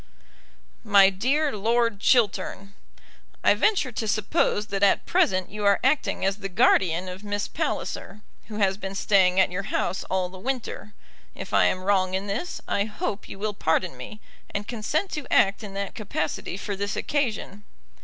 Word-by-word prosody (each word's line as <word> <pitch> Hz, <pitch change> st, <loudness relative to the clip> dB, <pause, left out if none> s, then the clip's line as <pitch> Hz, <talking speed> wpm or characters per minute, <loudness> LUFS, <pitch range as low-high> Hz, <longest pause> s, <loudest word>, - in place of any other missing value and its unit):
MY 200 Hz, -3 st, +6 dB
DEAR 270 Hz, +8 st, 0 dB
LORD 230 Hz, +1 st, +1 dB
CHILTERN, 200 Hz, -4 st, +1 dB, 0.7 s
I -, -, +6 dB
venture 385 Hz, -12 st, +1 dB
to 225 Hz, -1 st, -3 dB
suppose 210 Hz, 0 st, +1 dB
that 195 Hz, -1 st, -2 dB
at 200 Hz, -, +3 dB
present 185 Hz, -1 st, +1 dB
you 210 Hz, 0 st, -5 dB
are 200 Hz, -1 st, +4 dB
acting 265 Hz, -6 st, +1 dB
as 195 Hz, +1 st, +1 dB
the 195 Hz, -2 st, -5 dB
guardian 180 Hz, -1 st, +3 dB
of 185 Hz, +2 st, -7 dB
Miss 205 Hz, 0 st, -2 dB
Palliser, 210 Hz, +2 st, -4 dB, 0.3 s
who 215 Hz, -, -7 dB
has 195 Hz, -2 st, +2 dB
been 195 Hz, -1 st, -6 dB
staying 190 Hz, -2 st, +3 dB
at 190 Hz, -, +4 dB
your 180 Hz, +2 st, -2 dB
house 190 Hz, -, -1 dB
all 185 Hz, -1 st, -1 dB
the 185 Hz, +1 st, -12 dB
winter. 235 Hz, -3 st, -4 dB, 0.4 s
If -, -, -8 dB
I -, -, +5 dB
am 185 Hz, -, 0 dB
wrong 190 Hz, -1 st, +2 dB
in 190 Hz, +1 st, -2 dB
this 215 Hz, -, -4 dB
I 200 Hz, -, +1 dB
hope 210 Hz, -1 st, -4 dB
you -, -, -8 dB
will 210 Hz, +1 st, -2 dB
pardon 165 Hz, -3 st, 0 dB
me, 130 Hz, +12 st, -9 dB, 0.3 s
and 200 Hz, 0 st, -4 dB
consent 275 Hz, -, -2 dB
to 300 Hz, -4 st, -6 dB
act 195 Hz, +2 st, +3 dB
in 200 Hz, -2 st, -8 dB
that 200 Hz, 0 st, -3 dB
capacity 185 Hz, -4 st, -4 dB
for 200 Hz, 0 st, -4 dB
this 200 Hz, +1 st, -3 dB
occasion. 225 Hz, -7 st, -2 dB
200 Hz, 175 wpm, -25 LUFS, 190-215 Hz, 0.7 s, MY